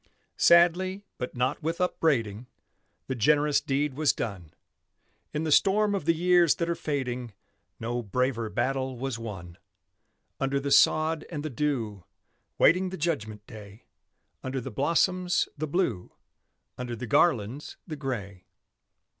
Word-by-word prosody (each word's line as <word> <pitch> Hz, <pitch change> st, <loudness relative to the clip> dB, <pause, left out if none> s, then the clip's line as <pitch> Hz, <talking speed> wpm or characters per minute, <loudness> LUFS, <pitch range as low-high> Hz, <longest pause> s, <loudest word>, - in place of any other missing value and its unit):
Sadly, 180 Hz, +3 st, +4 dB, 0.2 s
but 125 Hz, -, -5 dB
not 125 Hz, +3 st, -1 dB
with 165 Hz, +2 st, -2 dB
upbraiding, 125 Hz, -, 0 dB, 0.6 s
The 130 Hz, -, -3 dB
generous 145 Hz, +4 st, +3 dB
deed 140 Hz, +1 st, -1 dB
was 150 Hz, +1 st, +2 dB
done, 90 Hz, -8 st, -5 dB, 0.8 s
In 150 Hz, +1 st, -2 dB
the 160 Hz, -, -1 dB
storm 205 Hz, +5 st, +4 dB
of 195 Hz, -7 st, -2 dB
the 165 Hz, 0 st, +3 dB
years 175 Hz, -1 st, +4 dB
that 170 Hz, -, -2 dB
are 170 Hz, -, +1 dB
fading 125 Hz, -7 st, -3 dB, 0.5 s
No 120 Hz, +1 st, -2 dB
braver 115 Hz, +1 st, -1 dB
battle 130 Hz, +3 st, -1 dB
was 130 Hz, -2 st, -4 dB
won: 90 Hz, -7 st, -8 dB, 0.8 s
Under 135 Hz, +1 st, 0 dB
the 140 Hz, 0 st, -3 dB
sod 155 Hz, +2 st, +4 dB
and 150 Hz, -3 st, -5 dB
the 155 Hz, -, -3 dB
dew, 115 Hz, -, -2 dB, 0.5 s
Waiting 185 Hz, +3 st, +4 dB
the 190 Hz, -, -6 dB
judgment 110 Hz, -10 st, -3 dB
day; 105 Hz, 0 st, -12 dB, 0.6 s
Under 130 Hz, 0 st, -3 dB
the 130 Hz, +1 st, -6 dB
blossoms, 180 Hz, -, +1 dB
the 155 Hz, 0 st, -3 dB
Blue, 140 Hz, -, -1 dB, 0.7 s
Under 125 Hz, -1 st, -4 dB
the 120 Hz, +2 st, -6 dB
garlands, 125 Hz, 0 st, +1 dB
the 160 Hz, -, -6 dB
Gray. 105 Hz, -10 st, -5 dB
135 Hz, 140 wpm, -27 LUFS, 115-165 Hz, 0.8 s, Sadly